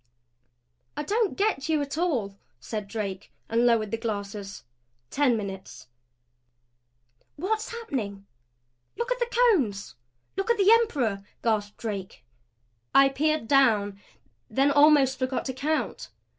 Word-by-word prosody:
"I - - -2
don't 425 +5 0
get 390 -8 0
you 315 -1 +2
at 280 0 -5
all," 260 - -1 0.2
said 210 - -5
Drake, 200 -2 -5 0.2
and 235 +2 +3
lowered 220 -3 +2
the 225 - -2
glasses. 205 -2 -5 0.5
Ten 275 -5 +2
minutes. 195 -2 -7 1.5
"What's 430 +7 -2
happening? 235 - -5 0.7
Look 470 +1 -3
at - - 0
the 480 - 0
Cones! 310 - +2 0.4
Look 390 +4 -2
at 470 - +3
the 400 +1 +5
Emperor!" 265 - +2 0.2
gasped 210 -3 0
Drake. 195 - -6 0.7
I 275 0 +7
peered 305 -2 0
down, 215 -7 +3 0.5
then 270 +5 +2
almost 285 -3 +5
forgot 255 0 -2
to 260 - -3
count. 300 +4 -2
260 Hz, 125 wpm, -26 LUFS, 205-315 Hz, 1.5 s, I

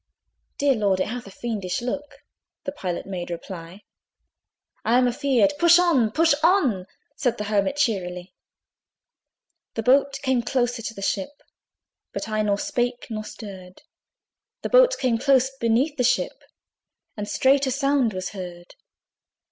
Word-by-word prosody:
"Dear 280 -1 +3
Lord! 200 -5 +1
it 185 - 0
hath 240 -2 -6
a - - -9
fiendish 200 -4 -3
look 280 +4 -5 0.4
(The 280 - -3
Pilot 185 -11 -4
made 180 -3 -5
reply) 170 +2 -8 1.0
I 235 +2 +3
am 250 0 +4
a 245 - 0
feared" 280 +1 +2
"Push 345 0 +7
on, 325 -11 +3
push 325 +7 +3
on!" 290 - +2 0.3
Said 245 -3 0
the 210 - -3
Hermit 205 +4 0
cheerily. 185 -9 -1 1.4
The 225 - -2
boat 275 +3 +3
came 260 -3 +2
closer 245 0 -1
to 225 0 -6
the 195 - -7
ship, 210 +10 -3 0.7
But - - -4
I 215 -1 0
nor 205 -1 +1
spake 245 +3 -2
nor 215 -1 -3
stirred; 190 -3 -10 0.8
The - - -2
boat - - +5
came 245 -4 +1
close 265 0 +3
beneath 260 +5 +1
the 250 - +1
ship, 245 - 0 0.7
And 210 -1 -5
straight 270 +1 +3
a - - 0
sound 275 -3 +2
was 185 -1 -4
heard. 180 -3 -9
240 Hz, 150 wpm, -24 LUFS, 200-275 Hz, 1.4 s, Push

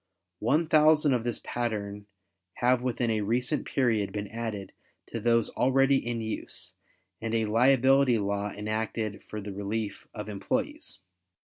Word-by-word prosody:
One 145 +10 +2
thousand 155 -2 +5
of 120 -2 0
this 120 -1 -2
pattern 105 -4 -3 0.5
have 125 0 +2
within 120 -2 0
a 110 -1 0
recent 125 +7 0
period 115 -6 +1
been 105 -1 -4
added 110 -3 -5 0.4
to 115 - -3
those 115 0 +2
already 135 +1 +3
in 120 -2 -2
use 110 0 -4 0.5
and 115 0 -2
a 110 -1 +2
liability 130 +3 +4
law 100 0 -1
enacted 110 0 -3
for 105 - -7
the 100 -1 -6
relief 100 +1 -4
of 105 -2 -7
employes. 100 -2 -3
115 Hz, 140 wpm, -28 LUFS, 105-125 Hz, 0.5 s, thousand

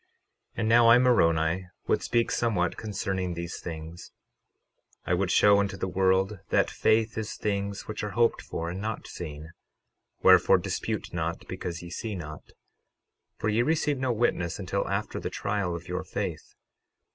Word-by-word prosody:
12:6 - - -42 0.5
And 110 - 0
now, 120 0 +6
I, 115 - +9
Moroni, 90 -8 +3 0.2
would - - +1
speak 115 0 +1
somewhat 90 -7 +1
concerning 95 -4 -3
these 85 0 -5
things; 80 0 -8 0.9
I - - 0
would 90 +1 +1
show 100 +2 +5
unto 100 -1 -1
the 95 - -2
world 95 +2 +1
that - - +2
faith 110 0 +2
is 110 - -4
things 100 -1 -3
which 105 -1 -5
are 105 -2 -4
hoped 120 -1 +3
for 85 +1 -4
and 95 +2 -5
not 110 +1 -4
seen; 80 -1 -8 0.7
wherefore, - - +7
dispute - - -3
not 85 -1 -3
because 85 -1 -5
ye 85 - -9
see 110 +3 -4
not, 75 -4 -8 0.9
for - - -2
ye 110 +2 +2
receive 150 0 +1
no 130 -1 0
witness 105 -7 0
until - - -2
after - - -2
the - - -4
trial 100 -4 -2
of 85 +1 -8
your 90 +1 -3
faith. 90 - -5
95 Hz, 165 wpm, -27 LUFS, 85-110 Hz, 0.9 s, I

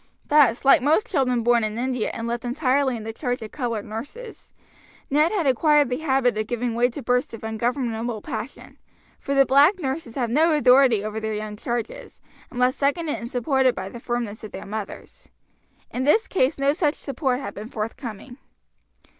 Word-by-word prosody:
Thus 275 -5 +4
like 275 +2 +6
most 310 - +3
children 250 - +1
born 240 0 +3
in 215 0 -2
India 250 -1 -1
and 230 - -5
left 235 0 -3
entirely 260 0 +1
in 220 - -8
the 225 +1 -5
charge 245 -1 -3
of 215 - -8
colored 230 -6 -3
nurses, 290 - -9 0.6
Ned 300 +4 +3
had 390 -7 0
acquired 290 +1 +3
the 250 - -1
habit 265 -6 +1
of 215 - -2
giving 240 0 -2
way 240 +2 +2
to 265 +3 -8
bursts 250 -1 0
of 225 - -13
ungovernable 230 0 -2
passion; 235 +5 -7 0.4
for 280 - -3
the 275 0 +6
black 285 +9 +5
nurses 270 -6 -4
have 240 -4 -1
no 315 +5 +3
authority 255 -6 +5
over 215 +1 -3
their 220 -1 -3
young 210 0 -5
charges, 235 +1 -5 0.3
unless 250 0 +1
seconded 295 +2 0
and 235 - -7
supported 260 0 +1
by 190 +1 -5
the 235 - -9
firmness 235 -3 -4
of 215 - -8
their 190 - -8
mothers. 210 0 -8 0.6
In 255 - -2
this 300 +11 +3
case 285 -5 +1
no 275 +1 +2
such 300 -2 0
support 265 -2 -2
had 275 - -6
been 215 +3 -8
forthcoming. 230 +2 -6
250 Hz, 185 wpm, -23 LUFS, 230-280 Hz, 0.6 s, like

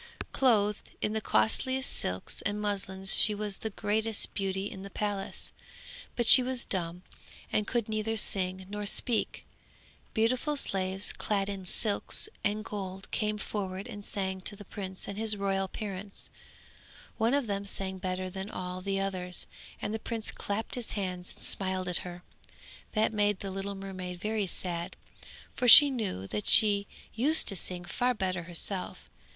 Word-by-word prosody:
Clothed 210 -5 +1
in 210 - -1
the 220 - -1
costliest 260 - +1
silks 90 +1 -1
and 205 +1 -2
muslins 195 -2 0
she 210 - +4
was 205 -1 -4
the 220 - -3
greatest 215 +1 0
beauty 195 -1 -2
in 195 - -7
the 200 - -8
palace, 200 -1 -3 0.6
but 240 - 0
she 255 - +12
was 255 -1 -3
dumb, 175 -1 -2 0.5
and 210 0 +1
could 235 -3 0
neither 220 +1 -1
sing 185 -3 0
nor 205 +1 -4
speak. 230 +2 0 0.7
Beautiful 250 +6 +1
slaves 190 -4 -1
clad 200 -1 -1
in 195 -2 -6
silks 210 - +2 0.2
and 210 +1 -1
gold 195 -2 -6
came 210 -1 -1
forward 195 -2 -4
and 205 -4 -8
sang 190 -2 -3
to 205 - -1
the 205 - -12
prince 190 -1 -6
and 200 +1 -5
his 220 -1 +1
royal 195 -1 0
parents; 200 0 -5 0.9
one 230 +4 +3
of 285 -3 0
them 200 -2 -2
sang 190 -1 -4
better 185 0 -3
than 190 +2 -6
all 180 -1 -5
the 195 +1 -1
others, 185 -2 -2 0.3
and 210 - -3
the 220 - -2
prince 225 0 -3
clapped 205 +2 -4
his 245 -3 -4
hands 180 -3 -4
and - - -9
smiled 185 -1 +1
at 180 - 0
her; 180 0 -7 0.7
that 220 0 +1
made 205 -2 +1
the 195 - -5
little 195 +1 -4
mermaid 185 -2 -7
very 210 0 -1
sad, 175 -1 -4 0.6
for 250 - -1
she 285 +4 +11
knew 205 - -3
that 105 +1 -4
she 205 -2 +7 0.3
used 290 +8 +4
to 200 - +3
sing 180 0 -2
far 245 +7 0
better 185 -3 -2
herself. 180 +2 -3
200 Hz, 165 wpm, -30 LUFS, 185-215 Hz, 0.9 s, she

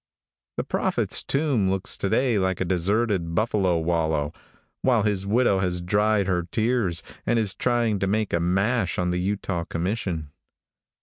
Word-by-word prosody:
The - - 0
prophet's - - -1
tomb 135 -9 +1
looks 95 0 -2
to 100 - -1
day 120 -1 +2
like 95 0 0
a 95 - 0
deserted 95 -1 0
buffalo 100 -4 +2
wallow, 80 -3 0 0.5
while 120 -5 +3
his 100 -2 -1
widow 110 -2 +3
has 90 -1 -1
dried 105 +3 +2
her 90 -2 -1
tears, 110 -8 0 0.2
and 120 - +1
is 105 -4 0
trying 120 -4 +1
to 95 - 0
make 105 +1 0
a 85 - +2
mash 95 +3 +1
on 90 -1 0
the 90 - -1
Utah 95 -2 -2
commission. 85 -4 -3
95 Hz, 160 wpm, -25 LUFS, 90-110 Hz, 0.5 s, while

